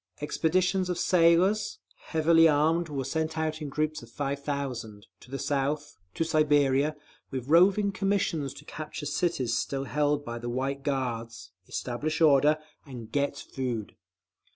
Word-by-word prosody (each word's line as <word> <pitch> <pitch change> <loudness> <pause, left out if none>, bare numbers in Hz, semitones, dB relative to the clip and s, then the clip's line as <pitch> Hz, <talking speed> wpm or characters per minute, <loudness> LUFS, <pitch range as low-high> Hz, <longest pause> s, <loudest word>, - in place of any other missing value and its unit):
Expeditions 180 +5 +1
of 180 - -1
sailors, 180 +4 +3 0.3
heavily 165 +1 +5
armed, 160 +3 +2
were 140 -2 -3
sent 160 +3 -2
out 155 0 -2
in 150 - -4
groups 155 +2 -2
of 120 - -13
five 140 +2 -3
thousand, 125 -8 -4
to - - -17
the 135 - -4
South, 145 +1 -1 0.2
to - - +1
Siberia, 150 -2 +2 0.3
with 130 -2 -5
roving 195 +5 +5
commissions 190 -7 0
to 150 - -12
capture 150 -1 -7
cities 145 -5 0
still 135 -1 -2
held 145 +1 0
by 120 -1 -5
the 120 +1 -5
White 135 +3 -2
Guards, 120 -6 -3 0.2
establish 150 +7 -3
order, 150 -1 +5 0.3
and 120 -5 -10
_get 140 0 0
food. 125 -6 -4
145 Hz, 145 wpm, -28 LUFS, 135-160 Hz, 0.3 s, heavily